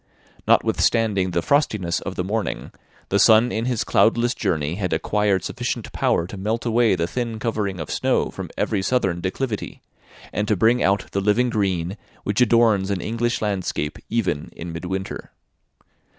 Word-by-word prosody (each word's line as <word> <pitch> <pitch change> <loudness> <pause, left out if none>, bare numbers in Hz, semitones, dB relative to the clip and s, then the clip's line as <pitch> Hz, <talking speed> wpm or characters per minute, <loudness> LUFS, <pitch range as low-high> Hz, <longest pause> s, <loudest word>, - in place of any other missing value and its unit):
Notwithstanding 105 -5 +2
the 85 -1 -1
frostiness 105 - +1
of 95 - -5
the 90 - -1
morning, 105 +3 -3 0.4
the 100 - +2
sun 115 +2 +6
in 110 +1 -2
his 125 -3 0
cloudless 120 +2 +3
journey 75 -1 -1
had 90 0 -2
acquired 105 -3 +1
sufficient - - -4
power 85 - +1
to 95 +3 -8
melt 110 +5 -2
away 115 -3 +3
the 85 -2 0
thin 115 +4 -3
covering 105 -4 -2
of 80 - -5
snow - - +1
from - - -7
every 105 -3 0
southern 95 -6 0
declivity, 105 +4 -3 0.5
and 105 - -1
to 105 - +2
bring 115 +6 +3
out 100 0 +1
the 100 - -1
living 115 +5 +2
green 95 -3 -1 0.3
which 105 +3 0
adorns 115 -5 +4
an 100 -2 -1
English 115 +4 -1
landscape 95 -7 -2
even 100 -10 -1
in 85 0 -7
midwinter. 95 +3 -5
105 Hz, 160 wpm, -22 LUFS, 95-115 Hz, 0.5 s, sun